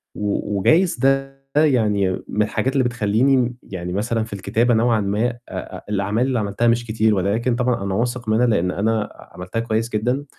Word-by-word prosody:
و 105 Hz, 0 st, -2 dB
وجايز 170 Hz, -, +3 dB
ده 135 Hz, 0 st, +1 dB, 0.2 s
يعني 110 Hz, -10 st, +3 dB, 0.2 s
من 105 Hz, -, -1 dB
الحاجات 125 Hz, +5 st, 0 dB
اللي 135 Hz, -2 st, +2 dB
بتخلّيني 120 Hz, +3 st, +2 dB
م 125 Hz, -1 st, 0 dB
يعني 90 Hz, -2 st, -6 dB
مثلًا 115 Hz, +2 st, -1 dB
في 110 Hz, -, -9 dB
الكتابة 115 Hz, +5 st, +1 dB
نوعًا 115 Hz, 0 st, +3 dB
ما 100 Hz, +1 st, -1 dB
آآ 120 Hz, 0 st, -6 dB
آآ -, -, -7 dB
الأعمال 105 Hz, +5 st, 0 dB
اللي 125 Hz, -3 st, 0 dB
عملتها 105 Hz, +3 st, 0 dB
مش 120 Hz, 0 st, +2 dB
كتير، 110 Hz, -1 st, +1 dB
ولكن 110 Hz, +6 st, 0 dB
طبعًا 125 Hz, -4 st, 0 dB
أنا 100 Hz, -1 st, -2 dB
واثق 120 Hz, 0 st, -2 dB
منها 115 Hz, +3 st, +3 dB
لإن 90 Hz, -5 st, +1 dB
أنا 110 Hz, +2 st, 0 dB
ع -, -, -16 dB
عملتها 90 Hz, +5 st, -5 dB
كويس 115 Hz, 0 st, -1 dB
جدًا، 125 Hz, +6 st, -1 dB
115 Hz, 190 wpm, -21 LUFS, 105-125 Hz, 0.2 s, وجايز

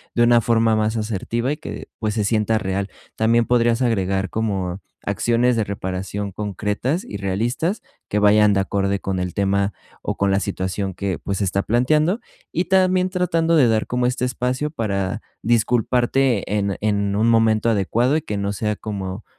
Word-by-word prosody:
de 120 Hz, -, +4 dB
una 120 Hz, 0 st, +5 dB
forma 115 Hz, 0 st, +2 dB
más 110 Hz, +1 st, 0 dB
asertiva 115 Hz, +4 st, -2 dB
y 150 Hz, -, -2 dB
que, 160 Hz, -, -8 dB
pues, 110 Hz, -1 st, -1 dB
se 105 Hz, -, +1 dB
sienta 110 Hz, +1 st, +1 dB
real. 95 Hz, -1 st, -2 dB, 0.3 s
También 115 Hz, +1 st, +3 dB
podrías 120 Hz, 0 st, +2 dB
agregar 95 Hz, -5 st, 0 dB
como 95 Hz, -4 st, -2 dB, 0.2 s
acciones 120 Hz, +1 st, +2 dB
de 110 Hz, -, +1 dB
reparación 100 Hz, 0 st, -4 dB
concretas 105 Hz, -, -2 dB
y 100 Hz, -, -6 dB
realistas 115 Hz, -, -1 dB, 0.3 s
que 105 Hz, -, -1 dB
vayan 105 Hz, 0 st, +5 dB
de 100 Hz, -, +2 dB
acorde 100 Hz, 0 st, -1 dB
con 95 Hz, -1 st, -2 dB
el 90 Hz, -1 st, -3 dB
tema 100 Hz, 0 st, +1 dB, 0.3 s
o -, -, -3 dB
con 100 Hz, 0 st, +1 dB
la 95 Hz, -, +3 dB
situación 95 Hz, -1 st, -3 dB
que, 95 Hz, -4 st, -3 dB
pues, 100 Hz, -1 st, -3 dB
se -, -, -1 dB
está 95 Hz, +1 st, 0 dB
planteando 150 Hz, -, +2 dB, 0.3 s
y 175 Hz, -, 0 dB
también 185 Hz, -1 st, +2 dB
tratando 170 Hz, -3 st, +1 dB
de 140 Hz, -6 st, +5 dB
dar 110 Hz, -1 st, +1 dB
como 125 Hz, 0 st, 0 dB
este 125 Hz, 0 st, -1 dB
espacio 130 Hz, +3 st, -2 dB
para 100 Hz, -, -2 dB, 0.2 s
disculparte 120 Hz, +1 st, +1 dB
en 100 Hz, -1 st, -1 dB
en 100 Hz, -1 st, 0 dB
un 110 Hz, +3 st, +2 dB
momento 115 Hz, -1 st, +3 dB
adecuado 115 Hz, +7 st, +2 dB
y -, -, -2 dB
que 105 Hz, -8 st, -3 dB
no 100 Hz, 0 st, -2 dB
sea 105 Hz, +1 st, -1 dB
como 100 Hz, -1 st, -5 dB
110 Hz, 175 wpm, -21 LUFS, 100-120 Hz, 0.3 s, una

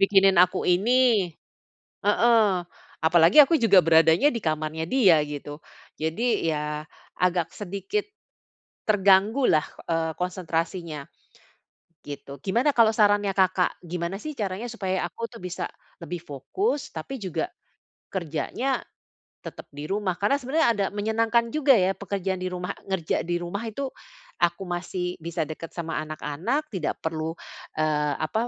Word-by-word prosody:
bikinin 195 Hz, -1 st, +5 dB
aku 180 Hz, -, +3 dB
ini." 215 Hz, 0 st, +3 dB, 0.7 s
Heeh. 210 Hz, -4 st, +4 dB, 0.4 s
Apalagi 165 Hz, -, +5 dB
aku 310 Hz, +4 st, +2 dB
juga 210 Hz, -5 st, +6 dB
beradanya 165 Hz, -, +5 dB
di 230 Hz, -, -2 dB
kamarnya 155 Hz, 0 st, -2 dB
dia, 195 Hz, -11 st, +5 dB
gitu. 145 Hz, 0 st, -7 dB, 0.4 s
Jadi, 165 Hz, +4 st, 0 dB
ya 150 Hz, 0 st, -3 dB, 0.4 s
agak 175 Hz, -2 st, +1 dB
sedikit, 200 Hz, -, -3 dB, 0.8 s
terganggu 205 Hz, +5 st, +4 dB
lah, 155 Hz, -1 st, +3 dB, 0.3 s
eee, 165 Hz, -1 st, 0 dB
konsentrasinya, 170 Hz, -4 st, -3 dB, 1.0 s
gitu. 140 Hz, -1 st, -8 dB
Gimana 235 Hz, +10 st, +2 dB
kalau 225 Hz, -2 st, +6 dB
sarannya 205 Hz, -2 st, +3 dB
Kakak 185 Hz, -1 st, +2 dB
Gimana 170 Hz, +2 st, -3 dB
sih 310 Hz, -, -4 dB
caranya 205 Hz, +3 st, -3 dB
supaya 190 Hz, -5 st, -2 dB
aku 230 Hz, +7 st, -5 dB
tuh 230 Hz, -, -11 dB
bisa 180 Hz, -1 st, -4 dB, 0.4 s
lebih 170 Hz, +1 st, -5 dB
fokus, 275 Hz, -, -3 dB
tapi 160 Hz, +12 st, -6 dB
juga, 195 Hz, -, -2 dB, 0.6 s
kerjanya 190 Hz, -, -2 dB, 0.6 s
tetap -, -, -9 dB
di 145 Hz, +1 st, -7 dB
rumah. 195 Hz, -2 st, -1 dB
Karena 210 Hz, +8 st, +2 dB
sebenernya 285 Hz, +3 st, +2 dB
ada 200 Hz, -, +1 dB
menyenangkan 225 Hz, +2 st, +1 dB
juga 295 Hz, -2 st, +4 dB
ya 190 Hz, -3 st, +3 dB
pekerjaan 195 Hz, -2 st, -3 dB
di -, -, -1 dB
rumah 180 Hz, +1 st, -4 dB, 0.2 s
ngerja 190 Hz, -4 st, -1 dB
di 175 Hz, +1 st, -2 dB
rumah 175 Hz, +5 st, -4 dB
itu 270 Hz, +5 st, -3 dB, 0.6 s
aku 175 Hz, +3 st, +1 dB
masih 180 Hz, 0 st, -3 dB
bisa 165 Hz, 0 st, -3 dB
dekat 160 Hz, +1 st, -7 dB
sama 165 Hz, -2 st, -3 dB
anak-anak, 155 Hz, -, -3 dB
tidak 175 Hz, -6 st, -2 dB
perlu, 160 Hz, 0 st, -3 dB, 0.4 s
eee, 150 Hz, -2 st, +1 dB
apa? 220 Hz, +9 st, -1 dB
185 Hz, 135 wpm, -25 LUFS, 165-220 Hz, 1.0 s, juga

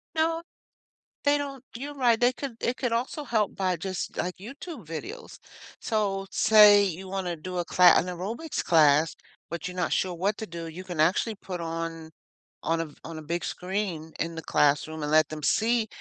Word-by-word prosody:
No. 325 Hz, +1 st, +1 dB, 0.8 s
They 290 Hz, 0 st, +4 dB
don't 275 Hz, -2 st, -6 dB
you're 280 Hz, +5 st, -6 dB
right. 240 Hz, -4 st, +3 dB
They 245 Hz, +1 st, +4 dB
could 260 Hz, -5 st, -6 dB
It 245 Hz, -, 0 dB
could 245 Hz, -3 st, -1 dB
also 250 Hz, +6 st, -2 dB
help 220 Hz, -5 st, 0 dB
by 185 Hz, -2 st, 0 dB
just, 185 Hz, +2 st, -4 dB
like, 180 Hz, 0 st, -2 dB
YouTube 270 Hz, -, -9 dB
videos. 415 Hz, -, -7 dB, 0.4 s
So, 200 Hz, -3 st, -1 dB
say 210 Hz, -1 st, +7 dB
you 190 Hz, 0 st, -4 dB
wanna 185 Hz, -2 st, -2 dB
do 180 Hz, +3 st, -7 dB
a 175 Hz, -, 0 dB
cla 180 Hz, +1 st, +6 dB
an -, -, +3 dB
aerobics 205 Hz, -, -4 dB
class, 155 Hz, -1 st, +4 dB, 0.3 s
but 170 Hz, +1 st, -4 dB
you're 180 Hz, 0 st, -6 dB
not 180 Hz, -, -1 dB
sure 185 Hz, -, +1 dB
what 195 Hz, +5 st, 0 dB
to 220 Hz, -, -5 dB
do, 170 Hz, -2 st, -7 dB
you 175 Hz, +3 st, -8 dB
can 175 Hz, -4 st, -4 dB
actually 185 Hz, +7 st, +2 dB
put 185 Hz, -2 st, -6 dB
on 165 Hz, -1 st, -4 dB, 0.5 s
on 165 Hz, 0 st, +1 dB
a -, -, -2 dB
v 150 Hz, -, -17 dB
on 165 Hz, 0 st, -7 dB
a -, -, -8 dB
big 170 Hz, +3 st, -3 dB
screen 180 Hz, -4 st, -3 dB
in 165 Hz, 0 st, -2 dB
the 165 Hz, -, -5 dB
classroom 150 Hz, +1 st, +1 dB
and 150 Hz, -, -2 dB
let 155 Hz, -2 st, +5 dB
them 155 Hz, -1 st, -7 dB
see, 225 Hz, +9 st, +2 dB
185 Hz, 195 wpm, -27 LUFS, 165-230 Hz, 0.8 s, say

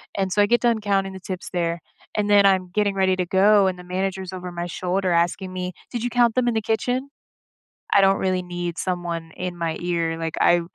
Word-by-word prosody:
And 190 Hz, -1 st, -1 dB
so 205 Hz, -, +3 dB
I -, -, +6 dB
get 240 Hz, +3 st, +2 dB
done 230 Hz, -3 st, +2 dB
counting 195 Hz, -1 st, 0 dB
the 190 Hz, -, -8 dB
tips 185 Hz, 0 st, -6 dB
there, 170 Hz, -1 st, -1 dB, 0.3 s
and 210 Hz, -1 st, -1 dB
then 205 Hz, -1 st, +6 dB
I'm 190 Hz, -2 st, +3 dB
getting 205 Hz, 0 st, +1 dB
ready 190 Hz, -1 st, +2 dB
to 180 Hz, -1 st, -1 dB
go, 200 Hz, +3 st, +4 dB
and 185 Hz, -1 st, -2 dB
the -, -, -9 dB
manager's 190 Hz, +1 st, -3 dB
over 180 Hz, -1 st, -6 dB
my 175 Hz, 0 st, -4 dB
shoulder 185 Hz, +1 st, -1 dB
asking 175 Hz, +2 st, 0 dB
me, 180 Hz, 0 st, -3 dB, 0.2 s
"Did 235 Hz, -2 st, -3 dB
you 245 Hz, -, 0 dB
count 240 Hz, -1 st, +3 dB
them 250 Hz, -1 st, +2 dB
in -, -, 0 dB
the 220 Hz, -, 0 dB
kitchen?" 245 Hz, +5 st, -1 dB, 0.8 s
I 200 Hz, -, +5 dB
don't 195 Hz, 0 st, +4 dB
really 185 Hz, -1 st, 0 dB
need 175 Hz, -1 st, -5 dB
someone 175 Hz, -3 st, -3 dB
in 180 Hz, -1 st, -4 dB
my 165 Hz, -1 st, -2 dB
ear. 170 Hz, -2 st, -1 dB
Like, 165 Hz, -1 st, -3 dB
I 175 Hz, -, +5 dB
185 Hz, 230 wpm, -23 LUFS, 175-205 Hz, 0.8 s, I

